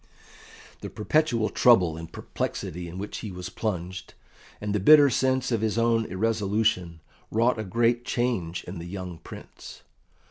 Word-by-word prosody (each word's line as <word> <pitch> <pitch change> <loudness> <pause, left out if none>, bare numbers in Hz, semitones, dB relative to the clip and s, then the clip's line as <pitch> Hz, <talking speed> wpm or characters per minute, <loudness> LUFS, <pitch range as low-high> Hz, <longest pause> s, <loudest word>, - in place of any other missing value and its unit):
The - - -7
perpetual 115 -2 +1
trouble 90 -10 +4
and 80 0 -9
perplexity 90 +1 -5
in 85 +2 -8
which 100 +2 -5
he 105 - -6
was 90 0 -7
plunged, 95 -3 -4 0.4
and 105 -1 -3
the 105 - +1
bitter 145 +6 +7
sense 130 +1 +1
of 115 -3 0
his 110 0 0
own 115 -1 +2
irresolution, 100 -4 0 0.3
wrought 115 +1 +2
a - - -2
great 120 +4 +1
change 115 -10 -2
in 90 0 -8
the 85 - -7
young 90 -2 -7
Prince. - - -12
105 Hz, 150 wpm, -26 LUFS, 90-115 Hz, 0.4 s, bitter